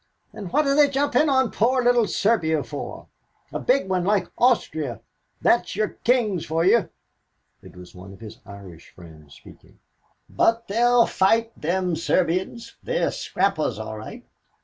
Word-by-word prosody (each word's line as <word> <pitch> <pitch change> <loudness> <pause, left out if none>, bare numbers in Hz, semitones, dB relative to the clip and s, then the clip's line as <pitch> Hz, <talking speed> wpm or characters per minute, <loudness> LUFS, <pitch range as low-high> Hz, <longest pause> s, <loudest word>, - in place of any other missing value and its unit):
"And 195 -5 -8
what 300 +7 +2
are 275 - +2
they 290 0 +4
jumping 285 +2 +1
on 265 -3 +2
poor 250 +3 +1
little 240 -2 +3
Serbia 160 -9 0
for, 145 - -8 0.5
a - - -3
big 255 -4 +1
one 185 -1 -1
like 200 0 0
Austria? 160 - 0 0.4
That's - - +2
your 215 +1 0
kings 225 -8 +1
for 165 +2 -1
you." 225 +3 +3 0.7
It - - -15
was 90 -1 -13
one 95 +1 -12
of 95 - -14
his 110 -1 -11
Irish 100 -5 -13
friends 80 -4 -16
speaking. - - -18 0.5
"But 230 0 0
they'll 235 +3 +3
fight, 225 +4 +1
them 180 +2 -1
Serbians; 185 +7 -2
they're - - -1
scrappers - - -1
all - - -6
right. - - -10
195 Hz, 150 wpm, -23 LUFS, 155-245 Hz, 0.7 s, they